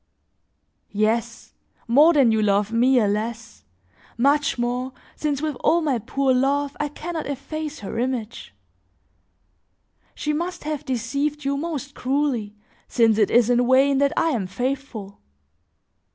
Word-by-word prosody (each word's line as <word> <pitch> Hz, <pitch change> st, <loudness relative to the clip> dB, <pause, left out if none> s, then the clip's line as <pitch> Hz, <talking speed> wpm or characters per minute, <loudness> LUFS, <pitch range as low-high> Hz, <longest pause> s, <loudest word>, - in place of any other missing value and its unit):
Yes, 220 Hz, +2 st, -1 dB, 0.3 s
more 290 Hz, +8 st, +6 dB
than 270 Hz, -7 st, +4 dB
you 220 Hz, 0 st, +2 dB
love 205 Hz, 0 st, +1 dB
me, 250 Hz, +3 st, +3 dB
alas! 225 Hz, +1 st, -2 dB, 0.5 s
much 285 Hz, +3 st, +2 dB
more, 250 Hz, +2 st, -2 dB, 0.2 s
since 290 Hz, -1 st, -2 dB
with 310 Hz, -1 st, -1 dB
all 335 Hz, +6 st, +2 dB
my 280 Hz, -7 st, 0 dB
poor 270 Hz, +4 st, 0 dB
love 280 Hz, +2 st, +1 dB
I 295 Hz, -, 0 dB
can 325 Hz, +4 st, -7 dB
not 320 Hz, -2 st, -4 dB
efface 300 Hz, +2 st, -5 dB
her 210 Hz, +2 st, -5 dB
image; 240 Hz, -3 st, -3 dB, 1.6 s
she 300 Hz, -, -2 dB
must 345 Hz, +4 st, -3 dB
have 305 Hz, -1 st, -4 dB
deceived 280 Hz, +4 st, -2 dB
you 280 Hz, 0 st, 0 dB
most 285 Hz, -2 st, -4 dB
cruelly 255 Hz, -7 st, -1 dB, 0.3 s
since 225 Hz, -2 st, +3 dB
it 210 Hz, -, +3 dB
is 240 Hz, 0 st, +4 dB
in 245 Hz, 0 st, +2 dB
vain 270 Hz, +1 st, +4 dB
that 280 Hz, 0 st, +3 dB
I 330 Hz, -, +3 dB
am 215 Hz, -9 st, -2 dB
faithful! 245 Hz, -2 st, -5 dB
260 Hz, 140 wpm, -23 LUFS, 230-290 Hz, 1.6 s, more